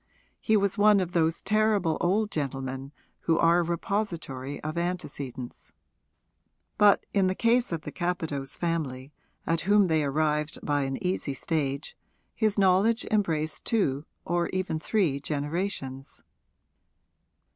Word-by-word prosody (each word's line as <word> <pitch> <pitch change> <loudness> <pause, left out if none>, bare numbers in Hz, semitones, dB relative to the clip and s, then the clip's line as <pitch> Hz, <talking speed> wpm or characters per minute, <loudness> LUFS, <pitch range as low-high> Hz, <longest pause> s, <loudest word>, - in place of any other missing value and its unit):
He 220 -1 +3
was 200 +1 0
one 210 -1 +6
of 180 -2 -2
those 165 -1 +1
terrible 210 -6 +2
old 210 +4 +1
gentlemen 135 -2 -4 0.4
who 165 - +4
are 170 +1 +4
a - - +2
repository 165 -6 -3
of 155 +1 -3
antecedents. 145 -8 -5 1.1
But 205 -1 +5
in 195 -2 +3
the 185 - 0
case 235 +1 +2
of 165 -2 -2
the - - -7
Capadose 160 -6 -3
family, 150 -5 -3 0.3
at 165 0 +1
whom 205 +1 +4
they 160 -1 +2
arrived 150 +1 0
by 145 -2 +1
an 135 0 -3
easy 180 -6 -1
stage, 140 -1 -2 0.4
his 215 -2 +1
knowledge 200 +5 +3
embraced 160 -7 0
two, 150 - 0 0.2
or 175 0 0
even 185 -4 -2
three, 160 -6 +1
generations. 145 -2 -4
165 Hz, 130 wpm, -27 LUFS, 145-195 Hz, 1.1 s, one